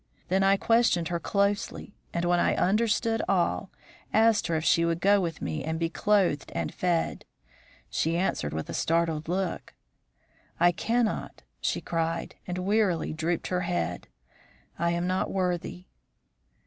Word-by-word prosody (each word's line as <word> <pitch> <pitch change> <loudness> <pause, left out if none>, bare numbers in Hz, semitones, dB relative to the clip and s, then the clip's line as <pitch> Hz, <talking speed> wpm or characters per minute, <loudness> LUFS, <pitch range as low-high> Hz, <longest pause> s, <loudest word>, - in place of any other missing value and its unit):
Then 190 +2 +2
I 195 0 +4
questioned 225 -7 +2
her 170 -1 -1
closely, 200 +2 -1 0.2
and, 170 0 -1
when 175 0 +3
I - - +2
understood 225 +3 +1
all, 190 +1 +1 0.4
asked 220 -1 +4
her 165 - 0
if 155 - -1
she 170 - +4
would 170 0 0
go 200 +2 +4
with 165 -3 -4
me 80 -2 -3
and 160 +1 -2
be 165 0 -1
clothed 190 -8 +1
and 85 -2 -2
fed. 175 -2 -1 0.6
She 165 +1 0
answered 175 - -1
with 80 +1 -4
a - - -6
startled 165 -2 0
look. 185 +1 -3 0.8
'I 175 +1 +6
cannot!' 230 +5 -1 0.2
she - - -1
cried, 165 0 -2
and 180 0 -3
wearily 190 -4 +1
drooped 165 +1 -2
her 180 -1 0
head. 85 - -2 0.7
'I 170 - +2
am 170 +1 0
not 185 +1 0
worthy.' 180 -1 -2
175 Hz, 150 wpm, -27 LUFS, 165-200 Hz, 0.8 s, I